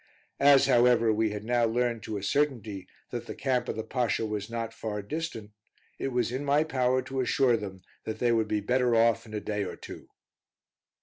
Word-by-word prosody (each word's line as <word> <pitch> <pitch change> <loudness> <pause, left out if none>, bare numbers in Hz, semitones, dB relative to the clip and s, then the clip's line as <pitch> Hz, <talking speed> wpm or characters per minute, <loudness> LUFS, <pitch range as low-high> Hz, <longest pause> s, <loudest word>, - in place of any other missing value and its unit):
As, 140 -1 +6
however, 120 -2 +4
we 110 0 +1
had 105 0 -5
now 120 +1 +1
learned 120 0 0
to 105 +1 -4
a 100 - -6
certainty, 110 -8 -1 0.2
that - - -5
the - - -6
camp 130 -3 -1
of - - -2
the 110 - -3
Pasha 120 -2 -1
was 105 0 -4
not 115 -1 -4
far 105 -2 -4
distant, 115 -5 -5 0.5
it - - -1
was 125 -3 0
in 130 +3 -3
my 145 +2 +3
power 130 -4 +1
to 135 +1 -4
assure 125 -1 +3
them 95 -4 -6 0.2
that 110 - -4
they 120 -1 +2
would 110 -2 +2
be 105 -1 0
better 125 +2 +2
off 115 0 +3
in 110 - -12
a - - -1
day 105 0 -2
or 95 - -5
two. - - -10
115 Hz, 205 wpm, -28 LUFS, 110-125 Hz, 0.5 s, As